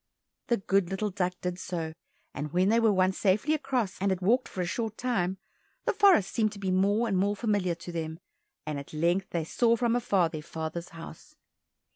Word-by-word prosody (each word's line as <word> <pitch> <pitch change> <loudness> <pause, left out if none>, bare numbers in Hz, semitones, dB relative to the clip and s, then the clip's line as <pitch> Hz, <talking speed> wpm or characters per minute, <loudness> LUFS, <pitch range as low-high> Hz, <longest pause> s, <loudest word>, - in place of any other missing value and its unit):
The 235 - +2
good 195 -2 +1
little 200 +2 -2
duck 180 -1 -1
did 180 0 -3
so, 165 -3 -4 0.4
and 150 0 -4
when 180 +3 +3
they 230 +2 +4
were 225 -2 +4
once 185 -1 +2
safely 210 +10 +2
across 260 -10 -1
and 200 - +2
had 190 -2 0
walked 235 +8 +2
for 185 - -4
a - - 0
short 220 +4 -3
time, 190 -7 0 0.5
the 470 - +2
forest 390 - +5
seemed 215 -2 +1
to - - -10
be 190 -2 -1
more 200 +5 +2
and 200 - 0
more 200 +2 +2
familiar 205 -5 0
to 175 +1 -9
them, 160 -1 -4 0.5
and 150 -2 -3
at 140 - -11
length 175 +5 +1
they 170 -2 -1
saw 230 +8 +2
from 235 0 +1
afar 200 -8 +2
their 155 -2 -6
father's 160 +2 -5
house. 165 - -11
190 Hz, 205 wpm, -29 LUFS, 175-225 Hz, 0.5 s, forest